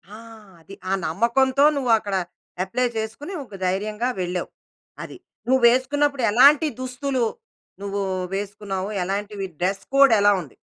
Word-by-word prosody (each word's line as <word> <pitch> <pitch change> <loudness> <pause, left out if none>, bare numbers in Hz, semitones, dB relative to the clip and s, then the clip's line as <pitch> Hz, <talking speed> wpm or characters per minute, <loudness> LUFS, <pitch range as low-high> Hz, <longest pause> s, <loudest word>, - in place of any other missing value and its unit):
ఆ! - - -10 0.4
అది. 195 +4 -12
ఆ - - -1 0.2
నమ్మకంతో 260 - +2
నువ్వక్కడ 225 -6 +1 0.5
అప్లై 235 +7 -1
చేసుకొని, 225 - -5
ఒక - - -26
ధైర్యంగా 210 +6 -1
వెళ్ళావు. 180 0 -3 0.5
అది. - - -10 0.3
నువ్వేసుకున్నప్పుడు 260 +2 +3
ఎలాంటి 285 +7 +6
దుస్తులు 255 0 -2 0.6
నువ్వు 200 0 -3 0.3
వేసుకున్నావు? 200 -1 -4 0.2
ఎలాంటివి 200 +1 -4
డ్రెస్ 195 +2 -1
కోడ్ 275 -3 +6
ఎలా 205 0 +5
ఉంది? 145 -7 -14
220 Hz, 120 wpm, -23 LUFS, 195-260 Hz, 0.6 s, ఎలాంటి